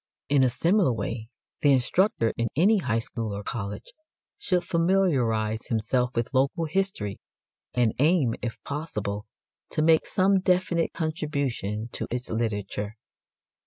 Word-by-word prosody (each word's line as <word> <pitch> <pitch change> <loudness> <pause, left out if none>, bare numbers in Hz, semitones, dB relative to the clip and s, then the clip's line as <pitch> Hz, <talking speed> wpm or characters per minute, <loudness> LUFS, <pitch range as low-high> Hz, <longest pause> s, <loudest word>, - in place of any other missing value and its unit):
In 140 -2 +4
a 130 - +4
similar 170 - +2
way 110 0 -3 0.3
the 145 - +5
instructor 130 - +2
in 115 - 0
any 200 +8 +4
high 120 -10 0
school 115 -2 -3
or 100 - -6
college 100 -2 -5 0.5
should 180 -2 +1
familiarize 135 - +1
himself 125 +2 0
with 115 +3 -1
local 140 +6 +2
history, 160 - -2 0.6
and 120 -3 +3
aim, 150 -5 +3
if 120 -2 -4
possible, 105 -9 -4 0.4
to 155 - 0
make 160 0 +4
some 195 +1 +3
definite 180 -2 +1
contribution 140 - -2
to - - -3
its 125 +1 -4
literature. 105 -2 -2
125 Hz, 130 wpm, -26 LUFS, 110-165 Hz, 0.6 s, the